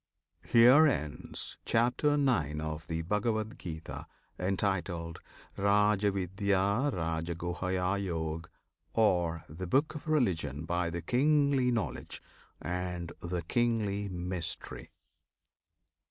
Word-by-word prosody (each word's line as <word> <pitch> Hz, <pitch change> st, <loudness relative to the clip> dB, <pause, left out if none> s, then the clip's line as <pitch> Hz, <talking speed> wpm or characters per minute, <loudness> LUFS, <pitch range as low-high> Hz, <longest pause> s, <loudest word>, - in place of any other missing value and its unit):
HERE 125 Hz, +7 st, +7 dB
ENDS 75 Hz, -, -2 dB
CHAPTER 125 Hz, +6 st, +2 dB
IX. 95 Hz, -, +1 dB
OF 80 Hz, 0 st, -5 dB
THE 80 Hz, 0 st, -2 dB
BHAGAVAD 110 Hz, +4 st, -1 dB
GITA, 80 Hz, -2 st, -7 dB, 0.3 s
Entitled 90 Hz, -3 st, -1 dB, 0.4 s
"Rajavidyarajaguhyayog," 95 Hz, -, 0 dB, 0.5 s
Or 90 Hz, -7 st, +2 dB
"The 85 Hz, +5 st, -6 dB
Book 140 Hz, -, +2 dB
of 155 Hz, 0 st, -8 dB
Religion 80 Hz, -, 0 dB
by 85 Hz, +1 st, 0 dB
the 85 Hz, 0 st, -5 dB
Kingly 140 Hz, -, +3 dB
Knowledge 115 Hz, -4 st, -2 dB, 0.4 s
and 90 Hz, -1 st, -3 dB
the 85 Hz, 0 st, -3 dB
Kingly 105 Hz, -1 st, 0 dB
Mystery." 90 Hz, -1 st, -5 dB
95 Hz, 85 wpm, -31 LUFS, 85-115 Hz, 0.5 s, HERE